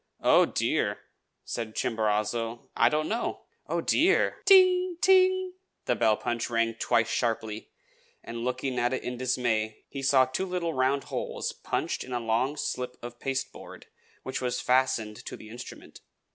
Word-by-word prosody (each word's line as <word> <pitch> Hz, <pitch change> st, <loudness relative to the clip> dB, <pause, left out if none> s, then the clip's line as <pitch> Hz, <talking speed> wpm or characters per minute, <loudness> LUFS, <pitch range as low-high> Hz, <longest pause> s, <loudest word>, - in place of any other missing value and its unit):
"Oh, -, -, +6 dB
dear!" -, -, 0 dB, 0.5 s
said 115 Hz, -2 st, -5 dB
Chimborazo, 110 Hz, +1 st, -1 dB
"I 115 Hz, -, +5 dB
don't 155 Hz, 0 st, 0 dB
know. 230 Hz, +2 st, -2 dB, 0.3 s
Oh, -, -, -1 dB
dear!" -, -, +2 dB
"Ting! 370 Hz, -2 st, +5 dB
ting!" 375 Hz, 0 st, +4 dB, 0.3 s
the -, -, +2 dB
bell 110 Hz, -3 st, +3 dB
punch 120 Hz, 0 st, -2 dB
rang 115 Hz, -1 st, +1 dB
twice 115 Hz, 0 st, +1 dB
sharply; 110 Hz, -3 st, -2 dB, 0.5 s
and 115 Hz, 0 st, -6 dB
looking 125 Hz, +1 st, -2 dB
at 120 Hz, +1 st, +1 dB
it 130 Hz, -, -3 dB
in 125 Hz, -, -4 dB
dismay, 120 Hz, -4 st, -1 dB
he 140 Hz, -, -6 dB
saw 135 Hz, -1 st, +5 dB
two 130 Hz, +9 st, -3 dB
little 175 Hz, -2 st, -2 dB
round 130 Hz, +1 st, +1 dB
holes -, -, -4 dB
punched -, -, -3 dB
in 130 Hz, -, -8 dB
a 120 Hz, -, 0 dB
long 120 Hz, +6 st, 0 dB
slip 125 Hz, -3 st, -3 dB
of 120 Hz, 0 st, -8 dB
pasteboard 135 Hz, -1 st, -5 dB, 0.4 s
which 130 Hz, 0 st, -4 dB
was 125 Hz, -1 st, -1 dB
fastened 125 Hz, -4 st, +1 dB
to -, -, -6 dB
the 110 Hz, -, -12 dB
instrument. 120 Hz, +2 st, -10 dB
125 Hz, 155 wpm, -28 LUFS, 115-140 Hz, 0.5 s, Oh